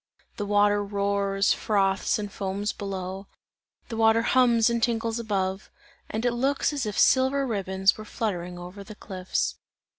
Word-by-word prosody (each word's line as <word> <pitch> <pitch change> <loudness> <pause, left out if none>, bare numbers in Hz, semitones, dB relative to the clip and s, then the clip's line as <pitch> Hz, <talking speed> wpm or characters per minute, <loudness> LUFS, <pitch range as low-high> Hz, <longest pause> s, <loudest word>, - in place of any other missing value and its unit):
The 205 - -3
water 205 0 +3
roars, 200 0 +1
froths 195 -3 +1
and 205 -1 -5
foams 200 +1 -3
below, 190 -1 -5 0.6
the 225 - -5
water 225 0 +4
hums 235 -3 +4
and 235 -1 0
tinkles 230 0 0
above, 195 -3 -2 0.4
and 220 +3 -3
it 245 - +2
looks 270 +4 0
as 275 -6 -2
if 210 - -4
silver 265 +1 +4
ribbons 195 -3 +1
were - - -6
fluttering 180 -5 -3
over 180 +3 -9
the 215 +2 -11
cliffs. 185 - -3
205 Hz, 150 wpm, -26 LUFS, 195-230 Hz, 0.6 s, water